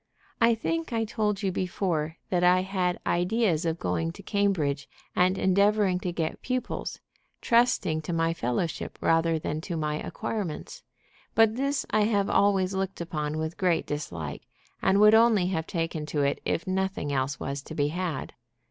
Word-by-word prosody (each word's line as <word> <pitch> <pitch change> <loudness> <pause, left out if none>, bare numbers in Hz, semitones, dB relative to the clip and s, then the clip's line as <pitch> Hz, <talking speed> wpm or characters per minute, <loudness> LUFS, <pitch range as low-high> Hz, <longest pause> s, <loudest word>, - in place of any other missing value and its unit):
I 230 0 +5
think 330 +8 -2
I 225 -1 0
told 210 -2 -1
you 195 - +1
before 170 -4 -2
that 180 -1 +2
I 180 +1 +5
had 185 -2 -1
ideas 180 -2 +1
of 165 0 -1
going 165 -1 -1
to 200 - -12
Cambridge 170 -10 0 0.3
and 185 +1 +3
endeavoring 200 0 +3
to 180 - -3
get 165 -2 -3
pupils, 255 0 -3 0.4
trusting 230 -9 +2
to 155 - -5
my 165 0 +1
fellowship 150 +3 -2
rather 165 0 +2
than 155 0 -3
to 170 0 -4
my 150 -1 -1
acquirements. 215 - -4 0.5
But 225 -1 +5
this 275 +2 0
I 210 0 +3
have 205 -2 +1
always 195 -2 +3
looked 190 0 -2
upon 155 -3 -3
with 160 +1 -3
great 180 -3 +1
dislike, 85 - -5 0.3
and 190 +1 +3
would 210 +1 +7
only 220 -4 +5
have 160 -3 -2
taken 165 -3 -3
to 150 -2 0
it 140 - 0
if 165 - -1
nothing 190 -6 -1
else 135 +1 -1
was 140 0 -4
to 155 - -9
be 145 -1 +1
had. 170 -3 -3
180 Hz, 165 wpm, -27 LUFS, 160-205 Hz, 0.5 s, would